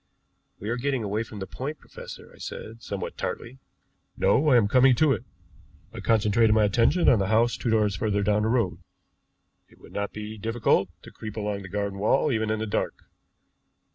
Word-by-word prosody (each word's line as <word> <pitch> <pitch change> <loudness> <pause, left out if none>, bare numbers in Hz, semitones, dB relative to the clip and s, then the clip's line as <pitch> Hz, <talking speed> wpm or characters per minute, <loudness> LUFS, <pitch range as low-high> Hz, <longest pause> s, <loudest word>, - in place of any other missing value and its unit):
"We 105 - -5
are 120 - -1
getting 135 -1 -1
away 105 +1 -1
from 110 -2 -8
the 95 - -4
point, 135 +10 -5
professor," - - -11
I - - -18
said, 115 +1 -8
somewhat 100 -4 -5
tartly. 130 +3 -5 0.6
"No, 150 +3 +3
I 125 - +6
am 110 -4 +4
coming 130 +3 +5
to 155 +3 +3
it. 110 - -1 0.7
I - - -7
concentrated 110 0 +3
my 110 - +4
attention 115 - +3
on 120 - +6
the 95 - 0
house 115 +3 +3
two 120 - -3
doors 105 -3 +2
further 100 0 0
down 105 +1 +2
the 110 - +1
road. 120 -1 0 0.9
It - - -21
would - - -16
not 100 0 -2
be 105 0 -7
difficult 110 -3 +1
to - - -12
creep 110 0 -8
along 105 -1 -2
the 95 - -9
garden 100 0 -3
wall 110 +8 +2
even 110 -2 0
in 110 - 0
the 110 - -2
dark. 105 - -1
110 Hz, 200 wpm, -26 LUFS, 105-120 Hz, 0.9 s, I